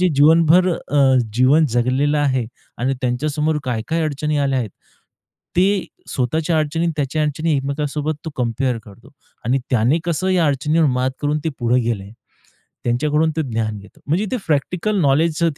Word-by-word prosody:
जे 185 - +4
जीवनभर 165 +5 +5
अ, 140 -5 +2 0.2
जीवन 140 +6 +4
जगलेलं 135 +5 +1
आहे 130 -5 +1 0.3
आणि 130 +3 0
त्यांच्यासमोर 150 +5 0
काय-काय 125 +7 -2
अडचणी 150 0 -1
आल्या 135 -2 +1
आहेत. 110 -5 -3 0.9
ते 195 +1 +3 0.2
स्वतःच्या 155 +6 0
अडचणी 155 +2 -1
आणि 165 - 0
त्याच्या 150 +2 -1
अडचणी 155 +2 0
एकमेकांसोबत 145 +2 -2
तो 160 - -4
कंपेअर 125 0 -1
करतो 105 +6 -16 0.3
आणि 130 +4 +2
त्याने 125 +6 +3
कसं 175 +2 -1
या 180 -4 +3
अडचणीवर 150 +3 +2
मात 130 0 +1
करून 150 +1 +1
ते 160 - +1
पुढे 120 +1 +2
गेले, 105 -4 -3 0.7
त्यांच्याकडून 150 +6 +1
ते - - +2
ज्ञान 110 -2 -2
घेतो. 100 - -17
म्हणजे 175 +8 +1
ते 255 - 0
प्रॅक्टिकल 180 +7 0
नॉलेजच 160 +2 +2
145 Hz, 155 wpm, -20 LUFS, 125-160 Hz, 0.9 s, जीवनभर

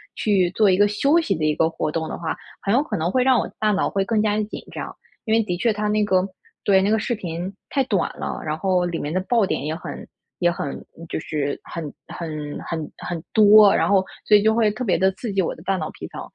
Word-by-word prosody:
去 195 -4 +2
做 210 +3 +3
一 185 - +3
个 205 +1 +5
休 275 +10 +3
息 210 -12 0
的 155 -1 -1
一 150 - +2
个 160 - +2
活 160 -2 -3
动 160 0 -2
的 - - -5
话， 165 -2 -3 0.3
很 200 - 0
有 260 - +4
可 220 -8 -3
能 165 +2 -1
会 255 +3 +2
让 255 -3 +4
我 - - -2
的 - - -16
大 215 - +2
脑 195 - +1
会 195 -1 0
更 220 +1 +1
加 210 -1 +1
地 215 - +1
紧 - - -8
张。 - - -6 0.3
因 220 - 0
为 225 - +5
的 180 -4 -3
确 230 +5 +2
它 210 0 -2
那 210 0 +2
个 185 -1 +2 0.4
对， 190 -1 +4
那 195 - +1
个 220 - +4
视 240 +2 -1
频 180 -2 -5 0.2
太 275 - +1
短 200 -8 0
了， - - -4
然 155 0 -2
后 185 0 +1
里 170 -1 -2
面 145 - -4
的 185 - +1
爆 230 +4 +2
点 - - -2
也 155 - -2
很 165 - -8 0.3
也 175 -1 +2
很 145 -5 -5 0.2
就 - - -2
是 145 -3 -3
很 170 - -6 0.2
很 155 -3 -6
很 160 -2 -5
很 170 -2 -5
多， 210 -1 +7
然 - - +2
后 195 -2 +3 0.2
所 210 - +6
以 205 - +1
就 220 0 +4
会 220 -1 +3
特 215 +5 -4
别 180 -3 +2
地 190 0 +3
刺 210 +2 -5
激 195 - +2
我 170 - -2
的 160 - -14
大 195 0 0
脑 - - -3
皮 - - -9
层， - - -8
195 Hz, 290 characters per minute, -22 LUFS, 170-215 Hz, 0.4 s, 多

